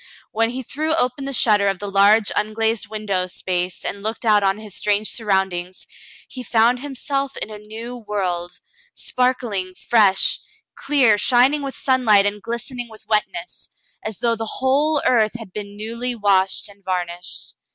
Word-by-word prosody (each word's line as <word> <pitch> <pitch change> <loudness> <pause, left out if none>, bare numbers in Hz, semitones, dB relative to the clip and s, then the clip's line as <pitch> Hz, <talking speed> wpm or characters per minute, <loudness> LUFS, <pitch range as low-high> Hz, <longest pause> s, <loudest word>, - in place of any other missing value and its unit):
When 225 +1 +1
he 255 +2 -5
threw 310 +6 -1
open 255 -2 -1
the 275 - -3
shutter 210 -5 +4
of 195 -1 +1
the 205 - -7
large 200 +2 +4
unglazed 220 +1 0
window 205 -4 -2
space 180 0 -3
and 200 - -4
looked 220 +3 -4
out 210 -2 +5
on 195 0 +1
his 215 -2 -10
strange 210 +1 0
surroundings, 190 -4 -1 0.4
he 255 - -7
found 240 +1 +3
himself 275 0 -3
in 215 - -5
a 210 - -8
new 225 +3 -8
world, 185 -5 -3 0.4
sparkling, 235 -8 -1
fresh, 205 -4 +3 0.3
clear, 250 -8 +3
shining 260 +6 +4
with 275 -1 -5
sunlight 230 -7 +3
and 205 0 -2
glistening 235 +2 -5
with 220 0 -11
wetness, 340 +12 -2 0.3
as 215 -3 -4
though 235 -1 +2
the 225 -1 -3
whole 285 +3 +2
earth 225 -3 +3
had 220 -5 -11
been 205 -1 -7
newly 235 +3 -4
washed 195 -3 +2
and 200 -1 -18
varnished. 180 -1 -4
215 Hz, 160 wpm, -21 LUFS, 200-245 Hz, 0.4 s, out